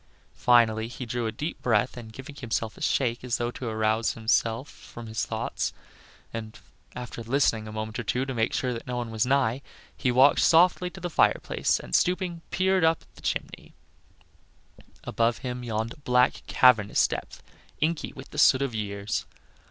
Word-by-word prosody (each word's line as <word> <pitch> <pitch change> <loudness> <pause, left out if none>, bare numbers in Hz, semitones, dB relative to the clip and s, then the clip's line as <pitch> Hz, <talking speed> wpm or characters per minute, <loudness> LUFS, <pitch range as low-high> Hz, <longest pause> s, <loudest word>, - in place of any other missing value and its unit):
Finally 115 -2 +3
he 125 +2 -7
drew 120 0 -2
a - - -2
deep 150 +9 -5
breath, 115 0 +1
and 115 -3 -9
giving 135 +6 -10
himself 115 -4 -3
a - - -15
shake 120 -3 0
as 120 -2 -1
though 120 0 -2
to 125 -1 -5
arouse 110 +1 +1
himself 115 +3 0
from 120 -4 -12
his 110 -1 -3
thoughts, - - -2 0.6
and 110 -2 -6 0.4
after 125 -1 -6
listening 115 -2 +1
a - - -7
moment 110 0 -4
or - - -3
two 125 +4 -1
to 135 - -4
make 115 -2 0
sure 125 -1 -1
that 115 - -7
no 125 0 -3
one 120 -2 -4
was 110 +2 0
nigh, 135 -2 +2 0.3
he 125 - 0
walked 130 +3 +5
softly 180 +2 +4
to 190 - -12
the 175 - -3
fireplace, - - +2
and - - -10
stooping, 180 - +1
peered 190 -1 +2
up 160 0 +2
the - - -16
chimney. - - -4 1.3
Above 115 0 +1
him 125 0 -4
yawned 110 0 -2
a - - -17
black 125 -3 +2
cavernous 115 -6 +4
depth, - - -7 0.4
inky 155 +2 -1
with 130 - -11
the 145 - -4
soot 135 -2 +6
of 135 -3 -3
years. 100 -1 -3
120 Hz, 180 wpm, -27 LUFS, 110-135 Hz, 1.3 s, soot